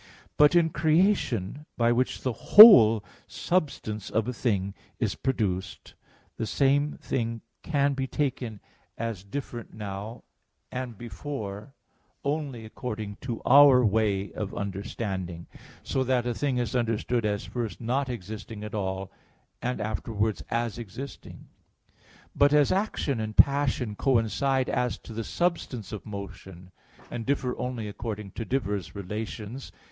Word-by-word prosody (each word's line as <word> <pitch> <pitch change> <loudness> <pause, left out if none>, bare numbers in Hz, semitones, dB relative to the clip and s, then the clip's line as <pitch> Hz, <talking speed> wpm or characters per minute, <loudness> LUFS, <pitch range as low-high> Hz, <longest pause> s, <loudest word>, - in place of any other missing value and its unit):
But 150 +3 +5
in 165 -2 +4
creation, 155 - +1
by 115 0 +3
which 125 +2 0
the 130 - 0
whole 115 - +9 0.2
substance 135 - -2
of 110 0 0
a 125 - -2
thing 100 -6 -1 0.2
is - - 0
produced, 100 -8 -2 0.4
the 110 - -2
same 145 +3 +2
thing 115 -2 -3 0.2
can 140 -3 +1
be 135 -1 -2
taken 125 -7 -2 0.4
as 115 -5 -4
different 120 +2 -7
now 105 +2 -6 0.5
and 125 -3 -5
before 120 -1 -6 0.5
only 140 -5 -3
according 110 -2 -6
to 120 -3 -5
our 135 -2 +7
way 100 -2 +1
of 105 -2 -5
understanding, 95 -3 -4 0.4
so 130 - 0
that 125 -1 +1
a 120 - 0
thing 135 +1 -1
is 120 -1 -1
understood 115 0 0
as 105 -1 -1
first 120 -3 -4
not 130 +3 -1
existing 110 -1 -7
at 105 - -7
all, 95 -2 -3 0.5
and 125 +1 -2
afterwards 110 0 -2
as 115 -1 -1
existing. 120 +5 -9 0.9
But 145 +1 +4
as 145 -2 +4
action 190 - 0
and 110 -1 -4
passion 140 -6 +3
coincide 130 +2 +1
as 125 -1 0
to 115 - -11
the 115 +1 -3
substance 155 - -2
of 105 - -7
motion, 95 -3 -9 0.4
and 120 -1 -4
differ 130 -1 -1
only 125 -4 -3
according 105 -1 -6
to 115 - -5
diverse 105 -8 -2
relations 105 +5 -6
(Phys. - - -20
115 Hz, 135 wpm, -27 LUFS, 105-135 Hz, 0.9 s, whole